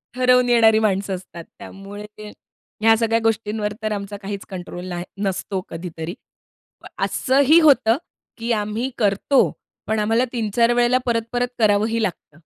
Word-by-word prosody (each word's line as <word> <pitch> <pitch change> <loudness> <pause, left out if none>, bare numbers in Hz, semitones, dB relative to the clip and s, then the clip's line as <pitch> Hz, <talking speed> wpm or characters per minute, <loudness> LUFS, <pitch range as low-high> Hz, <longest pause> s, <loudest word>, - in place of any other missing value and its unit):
ठरवून 250 -1 +4
येणारी 225 -2 +5
माणसं 195 -2 0
असतात. 175 -2 -10 0.2
त्यामुळे 200 +2 -9
ते 210 0 -9 0.5
ह्या 225 0 +6
सगळ्या 225 0 +1
गोष्टींवर 215 -1 -1
तर 215 - -1
आमचा 200 0 -4
काहीच 200 0 -6
कंट्रोल 180 -1 -7
नाही 175 -1 -5 0.2
नसतो 190 0 -2
कधीतरी. 165 0 -6 0.9
असंही 280 +5 +4
होतं 265 -7 +4 0.4
की 235 +1 -3
आम्ही 215 +4 -2
करतो 210 +6 +2 0.4
पण 220 0 0
आम्हाला 225 +4 +2
3-4 230 0 +1
वेळेला 245 +1 +3
परत-परत 235 +1 0
करावंही 220 +2 +2
लागतं. 175 -6 -5
215 Hz, 135 wpm, -21 LUFS, 200-235 Hz, 0.9 s, ह्या